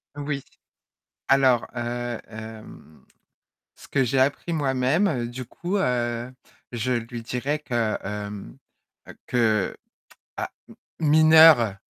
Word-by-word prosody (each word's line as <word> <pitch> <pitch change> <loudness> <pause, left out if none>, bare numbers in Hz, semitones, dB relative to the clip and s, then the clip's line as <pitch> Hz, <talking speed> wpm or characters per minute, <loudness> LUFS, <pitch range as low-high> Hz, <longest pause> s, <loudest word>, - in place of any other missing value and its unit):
Oui. 145 -1 -4 0.9
Alors 130 -3 +4
heu, 120 0 -3
hem, 110 -7 -11 0.7
ce - - -15
que 135 - +1
j'ai 130 +2 0
appris 140 +5 +1
moi-même 135 -1 +1
du 130 +1 -7
coup, 175 - -3
heu, 120 -5 -1 0.4
je 120 +2 -2
lui 120 0 -3
dirais 130 +6 -2
que, 120 -6 -1
hem, 105 -9 -6 0.7
que 110 -5 +1 0.6
ah, - - -4 0.5
mineure? 155 -7 +6
125 Hz, 100 wpm, -24 LUFS, 115-140 Hz, 0.9 s, mineure